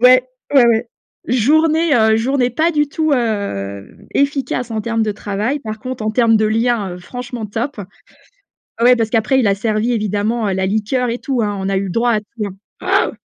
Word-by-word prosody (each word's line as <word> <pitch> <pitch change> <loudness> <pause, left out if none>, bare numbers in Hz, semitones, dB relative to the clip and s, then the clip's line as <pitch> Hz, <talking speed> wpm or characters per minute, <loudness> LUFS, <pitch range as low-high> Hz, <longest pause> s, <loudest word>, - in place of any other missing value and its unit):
ouais, 255 +1 +6 0.3
ouais, 265 -3 +7
ouais, 230 0 +2 0.4
journée, 310 +6 +3
heu, 220 -1 +4
journée 250 +2 +1
pas 315 +8 +1
du 295 -3 +1
tout, 310 0 0
hem, 200 - -3
efficace 275 -3 0
en 220 -1 -2
termes 225 +1 -1
de 215 -1 0
travail, 210 +7 -2
par 220 -5 -6
contre, 255 0 -6
en 215 - +1
termes 225 0 +3
de 215 - +2
lien, 220 -3 0
heu, - - -9
franchement, 245 +5 -7
top. 225 +4 -4 1.0
Ouais, 250 +1 +6
parce 225 -2 0
qu'après, 225 +4 +2
il 240 - +2
a 200 - +3
servi, 215 +3 0
évidemment, 215 +1 -1
heu, 195 - 0
la 190 0 0
liqueur 220 +5 0
et 235 - -2
tout, 260 -4 -1
hein, 205 -2 -1
on 190 0 -2
a 195 - +1
eu 195 - -1
le - - -4
droit 235 +4 +1
à 215 - +2
tout. 210 -2 -6 0.3
Waouh! - - +2
230 Hz, 205 wpm, -18 LUFS, 210-250 Hz, 1.0 s, ouais